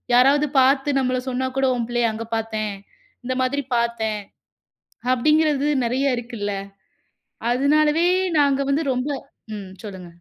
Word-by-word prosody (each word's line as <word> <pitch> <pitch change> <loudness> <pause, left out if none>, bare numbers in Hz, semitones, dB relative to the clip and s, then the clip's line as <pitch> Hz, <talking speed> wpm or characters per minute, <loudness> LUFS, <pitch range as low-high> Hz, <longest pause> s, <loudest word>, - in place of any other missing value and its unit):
யாராவது 280 +4 +5
பாத்து 270 +2 +3
நம்மள 255 -1 0
சொன்னா 260 +1 -1
கூட, 270 - +3
"உன் 235 -1 -2
புள்ளைய 240 -1 +1
அங்க 220 +1 -5
பாத்தேன்! 220 -2 -2 0.5
இந்த 255 +1 -1
மாதிரி 280 +2 0
பாத்தேன்!" 225 -3 -1 0.9
அப்டிங்கிறது 300 +2 +2 0.2
நெறைய 255 +2 +1
இருக்குல்ல! 220 -4 -4 1.0
அதனாலவே 300 +5 +3 0.3
நாங்க 280 -1 +3
வந்து 300 +4 +1
ரொம்ப 255 +3 -2 0.5
ம் 200 -2 -7 0.2
சொல்லுங்க! 190 -3 -8
255 Hz, 125 wpm, -22 LUFS, 230-280 Hz, 1.0 s, யாராவது